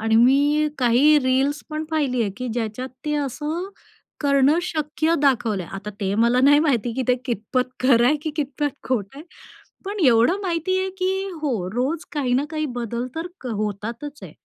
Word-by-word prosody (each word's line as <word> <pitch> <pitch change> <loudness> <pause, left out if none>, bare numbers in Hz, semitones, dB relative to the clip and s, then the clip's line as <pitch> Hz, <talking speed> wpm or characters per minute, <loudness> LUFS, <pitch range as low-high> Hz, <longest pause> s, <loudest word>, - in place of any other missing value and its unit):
आणि 225 0 +2
मी 285 +5 +4
काही 260 +5 +5
रील्स 270 +2 +1
पण 310 +1 -3
पहिली 275 -6 0
आहे 200 - -1
की 250 -1 -4
ज्याच्यात 235 +2 -3 0.2
ते 300 0 -1
असं 300 +6 -3 0.5
करणं 280 +2 +3
शक्य 315 0 -1
दाखवलंय. 225 -9 +1
आता 200 +2 -6
ते 195 0 0
मला 235 +3 +3
नाही 290 +2 +6
माहिती 245 -7 +1
की 260 - -1
ते 250 - +5
कितपत 250 +2 -1
खरं 245 -2 +4
आहे 300 - +4
की 315 - -2
कितपत 290 0 -2
खोट 225 -7 0
आहे. 290 - -9 0.6
पण 405 +1 -4
एवढं 245 - +4
माहिती 370 +1 0
आहे 380 0 -2
की 370 0 +1 0.3
हो, 225 -11 -1
रोज 275 +7 -1
काही 270 -5 -1
ना 275 +3 +2
काही 310 -1 -2
बदल 235 +2 -3
तर 330 +2 -3
क 255 - -8
होतातच 225 +6 -4
आहे. - - -9
265 Hz, 180 wpm, -22 LUFS, 235-300 Hz, 0.6 s, नाही